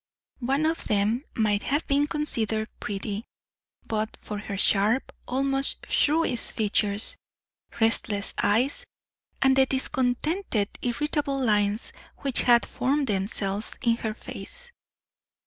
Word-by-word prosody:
One 275 +4 0
of 325 +1 -1
them 210 +4 +1
might 210 -2 +1
have 290 +4 -1
been 285 +1 +2
considered 225 -8 0
pretty, 205 +1 -4 0.6
but 215 0 -2
for 210 -1 -6
her 205 -1 -5
sharp, 210 +5 +2 0.2
almost 270 +1 +2
shrewish 300 -5 +2
features, 210 -1 +1 0.6
restless 220 -2 +1
eyes, 255 - +1 0.6
and 265 0 +5
the 265 0 +5
discontented, 260 - 0
irritable 285 +3 -1
lines 210 0 +1 0.2
which 275 -3 0
had 240 -1 +5
formed 275 +3 0
themselves 200 -1 -1
in 230 -1 +3
her 220 -2 -3
face. - - -9
235 Hz, 115 wpm, -26 LUFS, 210-275 Hz, 0.6 s, and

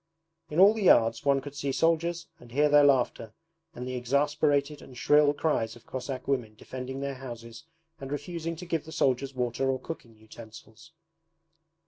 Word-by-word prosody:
In 150 - -1
all 200 +3 +8
the 220 - -4
yards 115 - +4
one 140 -1 +2
could 145 +1 -9
see 140 -1 -3
soldiers 170 +3 +1
and 120 -1 -15
hear 145 +4 +3
their 145 0 +6
laughter 125 -5 +2 0.4
and 125 -2 -6
the 130 - -4
exasperated 145 +3 0
and 125 - -13
shrill 150 +3 +4
cries 145 -7 -1
of 120 - -17
Cossack 130 0 -6
women 120 -6 -1
defending 130 +4 -7
their 140 0 -3
houses 120 -2 -9 0.3
and 135 0 -7
refusing 165 +2 -4
to 180 +3 -9
give 165 -3 -2
the 160 - -10
soldiers 135 -1 0
water 125 +1 -1
or 130 -1 0
cooking 125 -5 -9
utensils. 110 +6 -14
135 Hz, 170 wpm, -28 LUFS, 125-150 Hz, 0.4 s, all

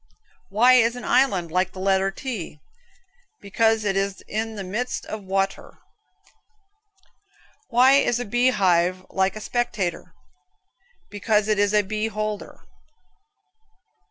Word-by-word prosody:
Why 235 +5 +5
is 235 -1 +4
an 245 - -8
island 190 -11 +1
like 185 +2 0
the 185 - -9
letter 190 0 +1
T? 195 - -6 0.8
Because 225 +2 +1
it 195 -1 0
is 195 -1 -2
in 220 +1 -3
the 200 - -5
midst 215 +7 -4
of 215 -1 -7
wa 195 0 +1
t - - -13
er. - - -17 1.9
Why 250 +2 +5
is 240 -3 +1
a 245 - -4
bee 240 +4 +2
hive 185 -4 +1
like 190 +1 0
a - - -6
spectator? 200 -7 -3 1.0
Because 210 +1 0
it 215 -1 +1
is 205 -1 +2
a 210 -1 +3
beeholder 215 0 -4
(beholder). - - -31
205 Hz, 135 wpm, -23 LUFS, 190-225 Hz, 1.9 s, Why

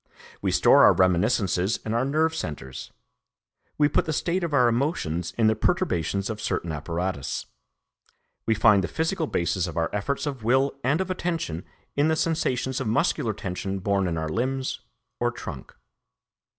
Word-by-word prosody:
We - - 0
store - - +6
our - - +8
reminiscences 95 +1 +2
in 110 - -2
our 120 +2 +2
nerve 155 +4 +1
centres; 75 - -6 0.9
we 150 - +5
put 145 - +1
the 155 - -2
state 175 +4 0
of 170 - -2
our 125 -4 +4
emotions 90 - -1
in 115 - +3
the 110 0 +4
perturbations 100 - 0
of 110 -1 -5
certain 85 - -2
apparatus; 85 0 -3 1.0
we 110 - +3
find 105 -3 +5
the - - -1
physical 160 0 -1
basis 85 - 0
of 85 - -7
our 85 0 0
efforts 105 +10 -2
of 135 -6 -4
will 130 +4 +3
and 140 +7 +2
of 185 0 -2
attention 165 - -3 0.3
in 145 +2 +3
the 160 - +2
sensations 135 -5 0
of 130 - -2
muscular 115 0 +1
tension 95 +1 -4
born 100 0 0
in 85 -2 -2
our 80 0 -2
limbs 130 +8 -2 0.4
or 120 - +2
trunk. 75 - -8
115 Hz, 165 wpm, -25 LUFS, 90-145 Hz, 1.0 s, our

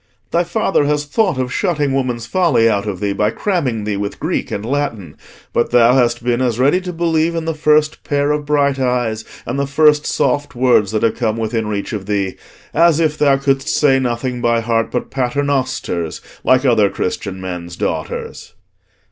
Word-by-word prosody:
"Thy 170 - +2
father 175 -3 0
has 150 0 0
thought 180 - 0
of 130 0 -2
shutting 150 -5 0
woman's 125 -4 -1
folly 170 -8 +2
out 105 -2 0
of 95 -3 -3
thee 100 -1 -1
by 105 +2 +1
cramming 130 - -1
thee 105 -1 -2
with 100 0 -4
Greek - - -2
and 100 - -4
Latin; 115 - -3 0.4
but 120 - +1
thou 120 0 +5
hast 120 -2 +2
been 120 0 0
as 120 -3 0
ready 140 +9 +3
to 180 -1 -5
believe 165 -1 0
in 165 -1 -2
the 165 - -1
first 150 0 +2
pair 145 0 0
of 150 0 -1
bright 140 -2 +1
eyes 120 -4 0 0.2
and 125 +4 -3
the 140 - 0
first 150 +1 +3
soft 145 -2 0
words 120 -5 +3
that 110 - -1
have 115 - +1
come 110 -2 -1
within 110 0 -2
reach 105 0 -3
of 100 -2 -5
thee, 100 -2 -1 0.4
as 165 -2 +4
if 155 -2 +1
thou 140 -3 +3
couldst 135 +1 0
say 140 -4 +3
nothing 125 0 -2
by 115 -1 +2
heart 115 0 0
but 125 - -4
Paternosters, 130 - -1 0.2
like 130 +1 +3
other 110 -6 +4
Christian 95 +1 -4
men's 90 -2 -6
daughters." - - -4
130 Hz, 190 wpm, -17 LUFS, 110-150 Hz, 0.4 s, thou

